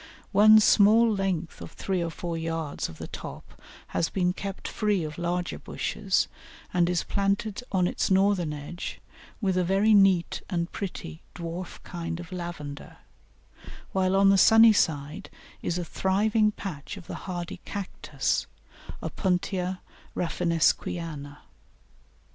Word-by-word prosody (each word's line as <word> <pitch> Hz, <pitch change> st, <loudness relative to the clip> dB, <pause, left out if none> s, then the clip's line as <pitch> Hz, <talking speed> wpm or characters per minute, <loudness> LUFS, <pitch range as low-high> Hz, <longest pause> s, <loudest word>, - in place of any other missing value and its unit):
One 215 Hz, +2 st, +8 dB
small 220 Hz, +2 st, +5 dB
length 190 Hz, -4 st, -2 dB
of -, -, -9 dB
three 190 Hz, -2 st, -2 dB
or 170 Hz, -, -2 dB
four 170 Hz, +2 st, -5 dB
yards 165 Hz, -2 st, -3 dB
of 80 Hz, -, -11 dB
the -, -, -6 dB
top -, -, -9 dB, 0.3 s
has 165 Hz, -, 0 dB
been 180 Hz, -2 st, +1 dB
kept 195 Hz, 0 st, -6 dB
free 210 Hz, -5 st, 0 dB
of 150 Hz, +1 st, -6 dB
larger 175 Hz, +1 st, -2 dB
bushes, 195 Hz, -3 st, -1 dB, 0.5 s
and 175 Hz, -1 st, +3 dB
is 180 Hz, -2 st, +1 dB
planted 200 Hz, +2 st, -1 dB
on 185 Hz, -2 st, +2 dB
its -, -, 0 dB
northern 190 Hz, -4 st, +3 dB
edge 150 Hz, +4 st, -6 dB, 0.4 s
with 190 Hz, -3 st, +1 dB
a 180 Hz, -, +3 dB
very 195 Hz, +4 st, +3 dB
neat 195 Hz, -4 st, +4 dB
and 170 Hz, -2 st, -2 dB
pretty 80 Hz, -, -6 dB
dwarf 170 Hz, +1 st, -6 dB
kind 170 Hz, -1 st, -5 dB
of 175 Hz, +2 st, -9 dB
Lavender, 170 Hz, -6 st, -7 dB, 0.9 s
while 190 Hz, 0 st, +1 dB
on 195 Hz, 0 st, +6 dB
the 195 Hz, -, +4 dB
sunny 225 Hz, +1 st, +8 dB
side 150 Hz, 0 st, -1 dB, 0.3 s
is 175 Hz, -, -1 dB
a 175 Hz, -, -3 dB
thriving 210 Hz, +5 st, +2 dB
patch 190 Hz, -3 st, -7 dB
of 185 Hz, -, -11 dB
the -, -, -7 dB, 0.2 s
hardy 175 Hz, -1 st, -4 dB
Cactus 200 Hz, -2 st, -2 dB, 0.6 s
(Opuntia 185 Hz, 0 st, -1 dB, 0.3 s
Raffinesquiana). 165 Hz, -3 st, -1 dB
180 Hz, 135 wpm, -27 LUFS, 170-195 Hz, 0.9 s, One